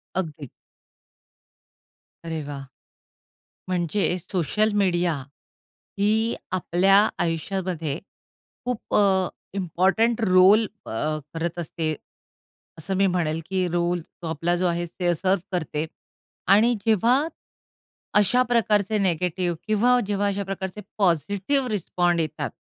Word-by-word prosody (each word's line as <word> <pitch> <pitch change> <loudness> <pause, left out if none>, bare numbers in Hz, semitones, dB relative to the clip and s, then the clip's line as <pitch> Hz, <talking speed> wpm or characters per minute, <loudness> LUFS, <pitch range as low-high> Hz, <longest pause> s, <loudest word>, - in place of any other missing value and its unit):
अगदी. 155 -7 -4 1.8
अरे 160 -1 -3
वाह! 140 -1 -6 1.0
म्हणजे 180 +2 0 0.2
सोशल 190 +5 0
मीडिया 175 -2 +2 0.9
ही 220 +3 +2 0.2
आपल्या 185 +2 +4 0.2
आयुष्यामध्ये 165 -2 -2 0.7
खूप 250 -2 -4
अ, - - +6 0.5
इम्पॉर्टन्ट 195 +6 +1
रोल 195 +2 +6 0.2
अ, - - -7 0.4
करत 170 +1 -3
असते. 160 -1 -2 0.8
असं 175 +4 -1
मी 195 0 +4
म्हणेल, 165 -2 0
की 185 -1 0
रोल 175 0 0
तो 170 +1 -11
आपला 165 +2 0
जो 180 +1 0
आहे, 175 0 -1
ते 175 +1 0
सर्व्ह 190 +2 +1
करते, 160 -4 -2 0.6
आणि 215 +5 +5
जेव्हा, 230 +3 +4 1.0
अशा 245 +5 +3
प्रकारचे 215 -3 +2
नेगेटिव्ह 180 -1 0
किंवा 240 +4 +4
जेव्हा 205 0 0
अशा 200 0 -1
प्रकारचे 195 +1 -5 0.2
पॉझिटिव्ह 200 - +1
रिस्पॉन्ड 175 -4 0
येतात, 155 -2 -3
185 Hz, 105 wpm, -24 LUFS, 170-205 Hz, 1.8 s, अ